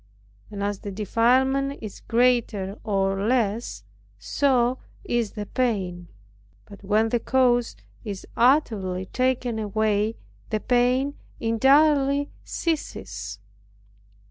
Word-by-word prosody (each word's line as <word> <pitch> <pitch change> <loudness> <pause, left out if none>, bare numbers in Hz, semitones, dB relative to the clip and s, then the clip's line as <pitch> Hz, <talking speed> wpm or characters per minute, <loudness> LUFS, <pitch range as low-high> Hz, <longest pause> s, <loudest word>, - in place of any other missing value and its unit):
And 200 -1 -5
as 205 -1 -2
the 205 - -6
defilement 255 +7 +1
is 215 -3 -8
greater 230 -5 +1
or 195 -1 0
less, 220 - 0 0.3
so 245 - +1 0.2
is 235 -3 -1
the 210 -1 -5
pain; 190 -9 -2 0.6
but 200 -1 -14
when 215 +3 +2
the 240 - +1
cause 245 -1 +2 0.3
is 200 -4 -6
utterly 215 -8 +2
taken 250 0 -1
away, 215 +1 0 0.3
the 215 - 0
pain 250 +4 +1 0.2
entirely 280 +4 +3
ceases. 100 - -4
225 Hz, 100 wpm, -24 LUFS, 200-255 Hz, 0.6 s, entirely